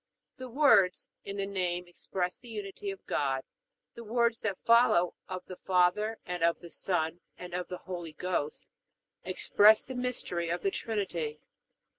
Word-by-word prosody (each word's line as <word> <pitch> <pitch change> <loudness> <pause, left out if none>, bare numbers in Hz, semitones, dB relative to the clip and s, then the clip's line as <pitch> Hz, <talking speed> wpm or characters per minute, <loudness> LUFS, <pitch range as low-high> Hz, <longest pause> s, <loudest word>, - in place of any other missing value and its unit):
The 255 -1 -7
words, 235 -9 +4 0.2
In 200 0 -5
the 195 - 0
name, 180 -2 -2
express 180 +1 -3
the 245 - -15
Unity 205 -2 -5
of 195 -1 -7
God; 135 -2 0 0.5
the 235 - -9
words 230 0 +1
that 200 -4 -2
follow, 230 -7 +5 0.2
of 185 -1 -5
the 185 - -8
Father, 185 +5 +2
and 180 -1 -4
of 170 0 +3
the 170 - -11
Son, 170 -2 -1 0.2
and 180 -1 -9
of 180 0 -2
the 180 - -5
Holy 175 -4 -5
Ghost, 155 -3 -2 0.6
express 215 +1 +5
the 260 - -7
mystery 250 -9 -2
of 175 +1 -2
the 195 - +2
Trinity. 175 -10 -2
185 Hz, 160 wpm, -30 LUFS, 175-215 Hz, 0.6 s, follow